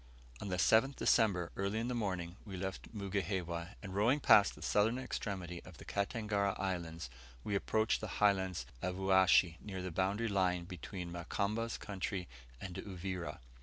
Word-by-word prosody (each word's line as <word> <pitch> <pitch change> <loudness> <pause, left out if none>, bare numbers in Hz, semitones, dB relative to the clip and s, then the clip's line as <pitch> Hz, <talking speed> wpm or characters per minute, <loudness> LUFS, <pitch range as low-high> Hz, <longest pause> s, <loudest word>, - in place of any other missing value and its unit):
On - - -4
the 90 -2 -1
7th 115 +9 +4
December, 95 -7 +3
early 100 +2 -1
in 115 +1 -1
the 125 - -1
morning, 90 -6 -2
we 95 -3 -7
left 95 +1 -5
Mugihewa, 95 -3 -2
and 95 -2 -6
rowing 115 +9 +3
past 105 -7 +6
the - - -10
southern 110 +4 +3
extremity 95 -8 -4
of 90 -4 -12
the - - -11
Katangara 100 -1 0
Islands, 85 -5 -3 0.4
we 105 - -3
approached 110 +2 +1
the - - -3
highlands 95 -4 +2 0.2
of 90 0 -1
Uashi 95 -3 +5
near 95 -3 -5
the 90 - -3
boundary 100 +6 0
line 90 -4 +1
between 90 0 -6
Mukamba's 105 +6 -2
country 95 -2 -4 0.3
and 90 +3 -6
Uvira. 95 -2 -5
95 Hz, 160 wpm, -35 LUFS, 90-105 Hz, 0.4 s, past